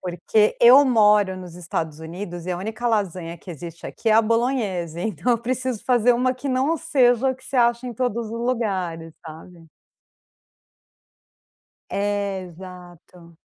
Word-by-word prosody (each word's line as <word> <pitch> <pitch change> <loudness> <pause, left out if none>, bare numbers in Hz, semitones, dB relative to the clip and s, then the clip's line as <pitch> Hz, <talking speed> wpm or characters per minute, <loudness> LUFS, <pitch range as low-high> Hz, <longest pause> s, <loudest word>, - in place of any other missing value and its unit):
Porque 185 +4 +1
eu 250 +4 +8
moro 210 -7 +3
nos 180 -2 -10
Estados 160 -3 -4
Unidos 175 +1 -7
e - - -2
a 175 - -1
única 220 +5 -4
lasanha 185 -6 -2
que 180 - -12
existe 170 +1 -9
aqui 230 - -4
é 215 - +5
a 225 - +6
bolonhese, 215 -8 -1
então 220 +5 -1
eu - - +2
preciso 255 -1 -3
fazer 245 -1 +3
uma 255 +2 +1
que 255 +2 -6
não 265 +5 +1
seja 260 -5 +2
o 260 - 0
que 260 - -20
você 270 - -5
acha 235 +1 +2
em 245 - -5
todos 235 -1 -2
os - - -8
lugares, 195 -9 -2
sabe? 165 +2 -12 2.2
É, 200 -1 -2
exato. 175 -1 -13
205 Hz, 155 wpm, -22 LUFS, 175-240 Hz, 2.2 s, eu